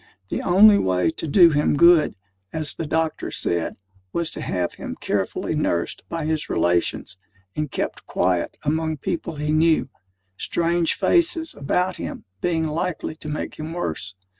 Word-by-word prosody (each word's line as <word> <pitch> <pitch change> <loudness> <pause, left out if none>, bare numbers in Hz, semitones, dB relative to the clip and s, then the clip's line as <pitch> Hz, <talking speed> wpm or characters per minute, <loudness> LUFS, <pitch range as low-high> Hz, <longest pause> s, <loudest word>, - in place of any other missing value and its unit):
The - - -2
only 200 +3 +7
way 90 - +1
to 160 - -5
do 170 +2 +6
him 150 0 +2
good, 170 -6 +6 0.4
as 155 -2 -1
the 165 - -5
doctor 160 0 -1
said, 85 -1 -1 0.4
was 170 -1 -1
to - - -7
have 90 -2 -2
him - - -7
carefully 100 +9 -1
nursed 85 - -1
by 165 -2 -3
his 155 -1 -1
relations, 85 +1 0 0.4
and 150 -1 -2
kept - - -4
quiet 90 -1 0
among 160 +1 0
people 165 +3 -3
he 150 +1 -2
knew; 155 -1 +3 0.5
strange 170 0 +1
faces 335 -2 +2
about 180 +6 -1
him - - -6 0.2
being 165 -2 +1
likely 155 +1 -2
to 155 - -7
make 150 - -4
him 155 +1 -5
worse. 95 - -4
155 Hz, 155 wpm, -23 LUFS, 140-170 Hz, 0.5 s, only